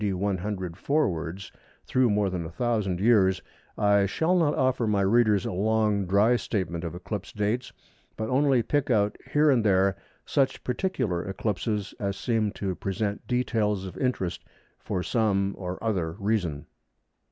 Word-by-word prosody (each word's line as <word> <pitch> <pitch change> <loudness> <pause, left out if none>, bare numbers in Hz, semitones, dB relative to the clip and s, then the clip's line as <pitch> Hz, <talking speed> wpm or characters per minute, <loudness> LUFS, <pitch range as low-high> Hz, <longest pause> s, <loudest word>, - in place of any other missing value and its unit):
D. 100 -2 +1
100 95 -2 -2
forwards 95 - -1 0.3
through 130 -2 +2
more 105 -2 +1
than 90 -2 -3
1000 100 0 -1
years, 95 -4 +3 0.3
I 100 -1 +3
shall 160 - +1
not 160 -5 +2
offer 130 -3 +1
my 105 -2 +2
readers 105 0 +3
a - - -2
long 105 0 +1
dry 105 +6 +4
statement 90 -8 -3
of 85 0 -5
eclipse 95 +3 -5
dates, 105 +5 -1 0.5
but 110 - -2
only 130 -1 +3
pick 145 +3 0
out 105 -3 +2 0.2
here 150 0 +4
and 120 -4 +3
there 95 -2 +3 0.3
such 135 -1 0
particular 125 - -1
eclipses 105 +1 -2
as 100 -2 -2
seem 110 -3 0
to 95 -2 -3
present 100 +3 -3
details 110 -6 0
of 90 -3 -8
interest 95 -8 -2 0.4
for 90 - -3
some 100 -4 +1
or 90 -1 -5
other 90 -8 -1
reason. 95 -7 -1
105 Hz, 150 wpm, -27 LUFS, 95-115 Hz, 0.5 s, dry